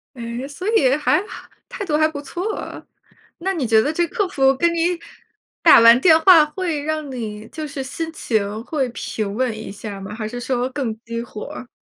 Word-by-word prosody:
诶， 235 Hz, +1 st, -5 dB
所 325 Hz, +7 st, -7 dB
以 265 Hz, -10 st, +4 dB
还 300 Hz, -, +2 dB
哈 -, -, -11 dB, 0.2 s
态 400 Hz, -, -5 dB
度 310 Hz, -5 st, 0 dB
还 310 Hz, 0 st, +4 dB
不 305 Hz, -2 st, -6 dB
错。 360 Hz, +9 st, -5 dB, 0.5 s
那 385 Hz, +3 st, -2 dB
你 315 Hz, -8 st, -2 dB
觉 220 Hz, -1 st, +4 dB
得 290 Hz, -, 0 dB
这 345 Hz, +2 st, +1 dB
客 405 Hz, +3 st, -1 dB
服 270 Hz, -6 st, +2 dB
跟 340 Hz, +5 st, +2 dB
你 340 Hz, +1 st, 0 dB, 0.6 s
打 -, -, +8 dB
完 230 Hz, +1 st, +8 dB
电 320 Hz, -1 st, +6 dB
话， 325 Hz, -2 st, +7 dB
会 315 Hz, -1 st, -3 dB
让 310 Hz, -1 st, -3 dB
你 220 Hz, -4 st, -6 dB
就 310 Hz, +4 st, -6 dB
是 280 Hz, -1 st, -5 dB
心 325 Hz, +5 st, -5 dB
情 215 Hz, -7 st, -2 dB
会 275 Hz, -5 st, -1 dB
平 215 Hz, -3 st, -4 dB
稳 245 Hz, -2 st, -1 dB
一 220 Hz, -, -7 dB
下 205 Hz, +1 st, -7 dB
儿 195 Hz, -, -8 dB
吗？ 195 Hz, +2 st, -7 dB
还 215 Hz, -1 st, -4 dB
是 245 Hz, +3 st, -6 dB
说 250 Hz, 0 st, -1 dB
更 260 Hz, -5 st, -2 dB
激 230 Hz, -1 st, -4 dB
火 215 Hz, -3 st, -8 dB
儿？ 255 Hz, -, -8 dB
270 Hz, 225 characters per minute, -21 LUFS, 230-320 Hz, 0.6 s, 打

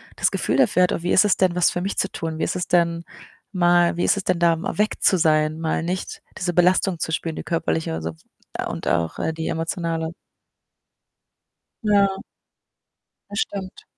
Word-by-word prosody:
das -, -, +2 dB
Gefühl -, -, -1 dB
dafür 220 Hz, -9 st, +4 dB
hat: 180 Hz, -, +2 dB
„Oh, -, -, -3 dB
wie 175 Hz, -, -1 dB
ist 190 Hz, -, +6 dB
es 205 Hz, -, +3 dB
denn, 185 Hz, -2 st, +2 dB
was 180 Hz, -1 st, +3 dB
für 175 Hz, -, -3 dB
mich 195 Hz, +2 st, -3 dB
zu 190 Hz, -, 0 dB
tun? 160 Hz, -1 st, -4 dB
Wie -, -, -2 dB
ist -, -, -1 dB
es 180 Hz, -1 st, -3 dB
denn 170 Hz, -1 st, +2 dB, 0.5 s
mal 175 Hz, -2 st, +3 dB
wie 175 Hz, -, 0 dB
ist -, -, +3 dB
es 195 Hz, -, -3 dB
denn 180 Hz, -2 st, +1 dB
da 170 Hz, -1 st, +4 dB
mal 165 Hz, -, -5 dB
weg 210 Hz, +1 st, 0 dB
zu 190 Hz, -, +4 dB
sein? 155 Hz, -1 st, +2 dB
Mal 160 Hz, 0 st, -1 dB
nicht 180 Hz, +2 st, -4 dB, 0.2 s
diese 175 Hz, -1 st, -2 dB
Belastung 180 Hz, 0 st, +3 dB
zu 160 Hz, -, -2 dB
spüren, 160 Hz, 0 st, -2 dB
die -, -, -6 dB
körperliche 160 Hz, -, -1 dB
und 80 Hz, -, -5 dB
sons 80 Hz, 0 st, -6 dB, 0.4 s
und -, -, -6 dB
auch, 85 Hz, -1 st, 0 dB
äh, 160 Hz, -, -1 dB
die 160 Hz, 0 st, -4 dB
emotionale.” 165 Hz, 0 st, -2 dB, 1.7 s
Ja. 205 Hz, -2 st, +4 dB, 1.2 s
Bestimmt. 200 Hz, -2 st, -4 dB
175 Hz, 195 wpm, -22 LUFS, 160-185 Hz, 1.7 s, ist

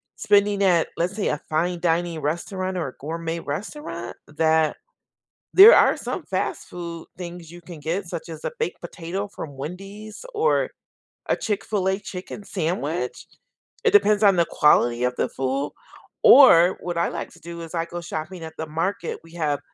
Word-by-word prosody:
spending 200 Hz, 0 st, +3 dB
at, 175 Hz, -4 st, +3 dB
let's 180 Hz, +4 st, -1 dB
say, 210 Hz, -, -1 dB
a 150 Hz, -, -1 dB
fine 170 Hz, +3 st, 0 dB
dining 170 Hz, -1 st, 0 dB
restaurant 185 Hz, +5 st, -2 dB
or 160 Hz, -, -2 dB
a 125 Hz, -, -9 dB
gourmet 165 Hz, +3 st, -4 dB
restaurant 170 Hz, -, -6 dB
that 160 Hz, 0 st, +2 dB, 0.8 s
there 405 Hz, +5 st, +11 dB
are -, -, +5 dB
some -, -, -4 dB
fast -, -, -3 dB
food 170 Hz, -2 st, -7 dB
things 175 Hz, -2 st, -8 dB
you 175 Hz, +1 st, -11 dB
can 165 Hz, -2 st, -11 dB
get 175 Hz, +5 st, -2 dB
such 170 Hz, 0 st, -6 dB
as 160 Hz, -2 st, -9 dB
a -, -, -2 dB
baked 460 Hz, -, -2 dB
potato 185 Hz, +4 st, -5 dB
from 145 Hz, -8 st, -8 dB
Wendy's 195 Hz, -, -8 dB
or 445 Hz, +3 st, +2 dB, 0.6 s
a -, -, +2 dB
Chick-fil-A 195 Hz, -2 st, -1 dB
chicken 195 Hz, +1 st, -8 dB
sandwich. 165 Hz, -7 st, -3 dB, 0.6 s
It -, -, +5 dB
depends 205 Hz, +1 st, +5 dB
on 200 Hz, -3 st, +6 dB
the 170 Hz, -1 st, +3 dB
quality 120 Hz, -5 st, +3 dB
of 125 Hz, 0 st, 0 dB
the -, -, -1 dB
food. 135 Hz, +2 st, -2 dB, 0.5 s
Or 180 Hz, -10 st, +8 dB
what 175 Hz, -1 st, -4 dB
I 170 Hz, -, +2 dB
like -, -, -6 dB
to -, -, -17 dB
do 170 Hz, 0 st, -8 dB
is 165 Hz, +1 st, -9 dB
I 165 Hz, -1 st, -1 dB
go 175 Hz, 0 st, -7 dB
shopping 170 Hz, +1 st, -6 dB
at 160 Hz, -, -8 dB
the 160 Hz, -, -4 dB
market. 165 Hz, +3 st, -2 dB
We 165 Hz, 0 st, -17 dB
have 150 Hz, -4 st, -1 dB
170 Hz, 175 wpm, -23 LUFS, 160-190 Hz, 0.8 s, there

